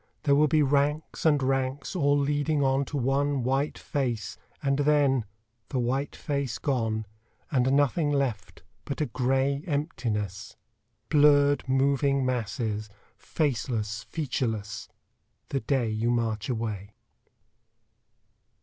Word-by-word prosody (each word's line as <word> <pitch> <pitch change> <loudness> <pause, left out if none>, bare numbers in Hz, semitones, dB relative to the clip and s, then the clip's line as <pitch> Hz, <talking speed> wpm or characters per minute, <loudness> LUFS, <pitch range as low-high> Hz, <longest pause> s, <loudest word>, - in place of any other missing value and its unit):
There 140 - +3
will 150 +2 +5
be 150 +1 +3
ranks 145 +3 +1
and 145 -3 +3
ranks, 135 +5 -1
all 145 -4 +3
leading 145 +1 +1
on 135 +1 +2
To 145 - -4
one 135 +1 +1
white 135 +4 0
face, 120 - -2 0.3
and 140 0 +1
then 140 -4 +3 0.4
the - - -2
white 130 +3 -1
face 140 -5 -2
gone, 115 -6 -1 0.5
And 130 -2 +2
nothing 145 +2 +2
left 135 -8 -2 0.2
but 140 - -5
a 155 - +1
gray 135 +3 0
emptiness 115 - -3 0.5
Blurred 145 -2 +4
moving 140 0 +2
masses, 110 -3 -2 0.3
faceless, 115 -7 -2
featureless 110 -9 -3 0.6
The 135 - 0
day 130 -5 0
you 110 +2 0
march 115 -3 -1
away. 110 -4 -4
135 Hz, 115 wpm, -27 LUFS, 115-145 Hz, 0.6 s, will